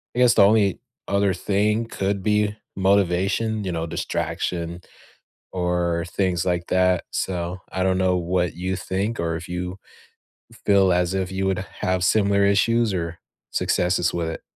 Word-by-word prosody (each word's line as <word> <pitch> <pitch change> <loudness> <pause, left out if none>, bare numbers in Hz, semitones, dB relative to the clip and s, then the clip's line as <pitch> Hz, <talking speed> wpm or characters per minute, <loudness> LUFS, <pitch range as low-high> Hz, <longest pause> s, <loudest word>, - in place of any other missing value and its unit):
I - - -1
guess 125 -1 +6
the - - +7
only 100 -2 +3 0.3
other 100 -1 +2
thing 105 +5 0
could 100 -3 -2
be 105 0 +1 0.2
motivation, 100 +3 +1
you 95 - -2
know, 80 0 -2
distraction 85 +1 -3 0.7
or 90 -2 0
things 90 -2 0
like 85 -1 0
that. 90 -1 +2
So 90 -1 -2
I 95 - -1
don't 95 0 +2
know 95 -1 +2
what 90 -1 0
you 90 +2 -2
think 95 +4 -2
or 85 -1 -1
if 90 +2 -8
you 90 +2 -4 0.7
f - - -17
feel 100 -2 +4
as 90 +1 +1
if 95 -1 -2
you 95 0 -2
would 95 -1 0 0.2
have 95 -1 0
similar 100 +1 +3
issues 110 +2 +2
or 85 -1 -3 0.3
successes 90 -1 +1
with 85 -1 -1
it. 80 - -6
95 Hz, 160 wpm, -23 LUFS, 90-100 Hz, 0.7 s, the